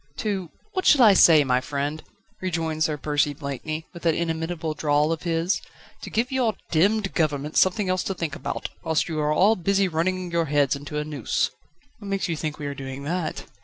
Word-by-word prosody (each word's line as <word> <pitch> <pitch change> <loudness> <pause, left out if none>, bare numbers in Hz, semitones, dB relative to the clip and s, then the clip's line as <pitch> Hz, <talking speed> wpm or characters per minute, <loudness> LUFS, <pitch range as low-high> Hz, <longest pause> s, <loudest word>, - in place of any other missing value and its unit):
"To 195 -5 -2 0.2
What 370 -1 0
shall 275 -4 +7
I 215 -3 +8
say, 160 -5 +7
my 125 -2 +1
friend?" 145 +3 -3 0.4
rejoined 165 -4 -1
Sir 155 -1 0
Percy 145 0 0
Blakeney, 150 +3 -5
with 170 - -10
that 165 -2 +2
inimitable 165 -1 -2
drawl 150 0 +1
of 165 - -2
his. 170 +2 0 0.4
"To - - -7
give 235 +3 0
your 245 -5 +1 0.2
demmed 195 +5 +2
government 150 -2 -1
something 190 +2 +3
else 185 0 +1
to 195 - -2
think 165 -5 -3
about, - - -4
whilst 160 -2 +1
you 160 -2 -3
are 150 0 +1
all 195 +8 +4
busy 195 +1 +1
running 180 +2 -1
your 170 -1 +1
heads 145 -2 +2
into 145 +2 -6
a 150 - 0
noose." 145 -6 -1 0.5
"What 205 - -9
makes 195 -1 -1
you 170 - -1
think 155 -1 -4
we 150 - -6
are 140 - -3
doing 135 0 -7
that?" 170 +3 -3
160 Hz, 200 wpm, -24 LUFS, 150-185 Hz, 0.5 s, I